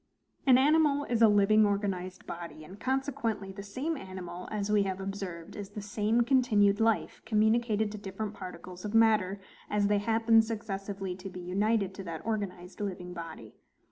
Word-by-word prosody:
An 255 Hz, -2 st, +8 dB
animal 290 Hz, +1 st, +4 dB
is 235 Hz, -4 st, -1 dB
a 225 Hz, -, +9 dB
living 210 Hz, +1 st, +5 dB
organized 195 Hz, -3 st, -1 dB
body; 170 Hz, -2 st, -7 dB
and 185 Hz, +6 st, -12 dB
consequently 240 Hz, -6 st, -1 dB
the 200 Hz, +1 st, -8 dB
same 260 Hz, +11 st, -3 dB
animal, 185 Hz, -, -7 dB
as 210 Hz, -1 st, -2 dB
we 210 Hz, -1 st, +4 dB
have 190 Hz, -1 st, -2 dB
observed, 190 Hz, -4 st, -6 dB
is 200 Hz, -2 st, -6 dB
the 205 Hz, 0 st, -7 dB
same 215 Hz, +3 st, +1 dB
continued 225 Hz, -6 st, +3 dB
LIFE 225 Hz, -1 st, +1 dB
communicated 220 Hz, 0 st, +2 dB
to 210 Hz, -, -7 dB
different 200 Hz, +1 st, -5 dB
particles 185 Hz, -2 st, -9 dB
of 210 Hz, +1 st, -3 dB
matter, 215 Hz, -4 st, +4 dB, 0.3 s
as 210 Hz, -1 st, +2 dB
they 205 Hz, 0 st, +3 dB
happen 225 Hz, +1 st, +4 dB
successively 195 Hz, -4 st, -4 dB
to 195 Hz, +1 st, -7 dB
be 180 Hz, -, -8 dB
united 200 Hz, +2 st, 0 dB
to 195 Hz, -, -7 dB
that 165 Hz, -2 st, -6 dB
organized 195 Hz, -4 st, -4 dB
living 180 Hz, -3 st, -4 dB
body. 165 Hz, -10 st, -8 dB
205 Hz, 170 wpm, -30 LUFS, 190-225 Hz, 0.3 s, a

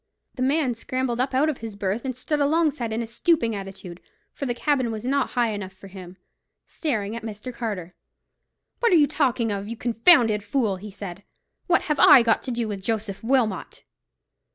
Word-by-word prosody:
The 255 Hz, -, -7 dB
man 270 Hz, 0 st, +2 dB
scrambled 245 Hz, +1 st, -3 dB
up 260 Hz, +1 st, 0 dB
out 280 Hz, +4 st, +3 dB
of 305 Hz, -4 st, -2 dB
his 225 Hz, -2 st, -7 dB
berth, 200 Hz, +4 st, -2 dB
and 260 Hz, -2 st, -3 dB
stood 295 Hz, +3 st, -1 dB, 0.5 s
in 225 Hz, +2 st, -1 dB
a -, -, -4 dB
stooping 230 Hz, -1 st, +1 dB
attitude, 195 Hz, -3 st, -8 dB, 0.3 s
for 275 Hz, -, -4 dB
the 240 Hz, -, -1 dB
cabin 260 Hz, -2 st, 0 dB
was 220 Hz, +1 st, -6 dB
not 275 Hz, +1 st, +1 dB
high 240 Hz, -2 st, +3 dB
enough 195 Hz, -2 st, -6 dB
for 195 Hz, +1 st, -14 dB
him, 185 Hz, -1 st, -11 dB, 0.5 s
staring 220 Hz, -, -3 dB
at 230 Hz, -, -5 dB
Mr. 220 Hz, +3 st, -7 dB
Carter. 200 Hz, -8 st, -5 dB, 0.9 s
"What 470 Hz, -, +2 dB
are -, -, +6 dB
you 305 Hz, -3 st, +6 dB
talking 260 Hz, -6 st, 0 dB
of, 200 Hz, 0 st, -3 dB
you 230 Hz, +1 st, -6 dB
confounded 230 Hz, -2 st, +4 dB
fool!" 205 Hz, -2 st, -1 dB
he 210 Hz, +3 st, -9 dB
said. 195 Hz, -1 st, -8 dB, 0.4 s
"What 345 Hz, -2 st, +3 dB
have 300 Hz, -2 st, -1 dB
I 250 Hz, -, +8 dB
got 230 Hz, -1 st, +2 dB
to 255 Hz, -, -3 dB
do 235 Hz, -1 st, -2 dB
with 200 Hz, -2 st, -5 dB
Joseph 210 Hz, -1 st, -3 dB
Wilmot?" 230 Hz, -5 st, 0 dB
230 Hz, 190 wpm, -24 LUFS, 205-260 Hz, 0.9 s, I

